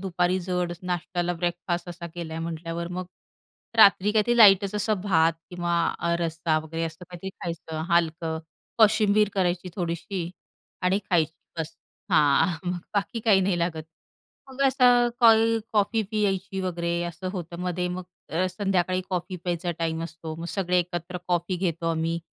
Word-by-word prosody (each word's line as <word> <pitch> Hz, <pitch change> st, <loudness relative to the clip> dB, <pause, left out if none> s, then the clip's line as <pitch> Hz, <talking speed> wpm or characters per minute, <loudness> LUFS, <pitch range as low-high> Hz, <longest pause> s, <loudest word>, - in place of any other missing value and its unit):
दुपारी 180 Hz, -1 st, 0 dB
जड 180 Hz, -1 st, -1 dB
नाश्त्याला 175 Hz, 0 st, -2 dB
ब्रेकफास्ट 175 Hz, +1 st, -2 dB
असा 175 Hz, 0 st, -7 dB
केला 170 Hz, -2 st, -6 dB
आहे 165 Hz, -, -4 dB
म्हटल्यावर, 165 Hz, +1 st, -4 dB
मग 180 Hz, +1 st, -5 dB, 0.7 s
रात्री 205 Hz, -1 st, +6 dB
काहीतरी 225 Hz, +2 st, +2 dB
लाईटच 200 Hz, -3 st, +7 dB
असं 210 Hz, -1 st, 0 dB
भात 165 Hz, -5 st, +3 dB, 0.2 s
किंवा 175 Hz, -1 st, -1 dB, 0.2 s
अ, 170 Hz, 0 st, 0 dB
रस्सा 165 Hz, -1 st, 0 dB
वगैरे 160 Hz, +1 st, -5 dB
असं 165 Hz, +2 st, -7 dB
काहीतरी 180 Hz, +2 st, -8 dB
खायचं 160 Hz, -2 st, -4 dB
हलकं, 165 Hz, -1 st, +1 dB, 0.4 s
कोशिंबीर 210 Hz, -1 st, +5 dB
करायची 180 Hz, -1 st, 0 dB
थोडीशी 175 Hz, 0 st, -3 dB, 0.5 s
आणि 180 Hz, +2 st, +3 dB
खायची, 165 Hz, -3 st, +3 dB, 0.3 s
बस 160 Hz, 0 st, -4 dB, 0.4 s
हां. 160 Hz, +1 st, +4 dB
मग 180 Hz, -, -2 dB, 0.2 s
बाकी 210 Hz, +3 st, -1 dB
काही 215 Hz, -3 st, +4 dB
नाही 185 Hz, -2 st, +1 dB
लागत. 170 Hz, -2 st, -1 dB, 0.7 s
मग 265 Hz, +1 st, -3 dB
असं 245 Hz, -2 st, +5 dB
कोई 225 Hz, -1 st, +6 dB
कॉफी 220 Hz, +1 st, +2 dB
प्यायची 195 Hz, -3 st, -1 dB
वगैरे 170 Hz, -2 st, -1 dB
असं 175 Hz, +2 st, -5 dB
होतं 170 Hz, -3 st, -6 dB
मध्ये, 180 Hz, 0 st, -1 dB
मग 180 Hz, +1 st, -5 dB, 0.3 s
अ, 175 Hz, +3 st, +1 dB
संध्याकाळी 185 Hz, -1 st, 0 dB
कॉफी 180 Hz, 0 st, -2 dB
प्यायचा 175 Hz, 0 st, -1 dB
टाईम 165 Hz, -1 st, -1 dB
असतो, 160 Hz, -1 st, -7 dB
मग 165 Hz, -, -6 dB
सगळे 180 Hz, -2 st, +1 dB
एकत्र 175 Hz, 0 st, -3 dB
कॉफी 175 Hz, +1 st, 0 dB
घेतो 170 Hz, -2 st, -2 dB
आम्ही. 165 Hz, +1 st, -1 dB
175 Hz, 150 wpm, -26 LUFS, 170-195 Hz, 0.7 s, लाईटच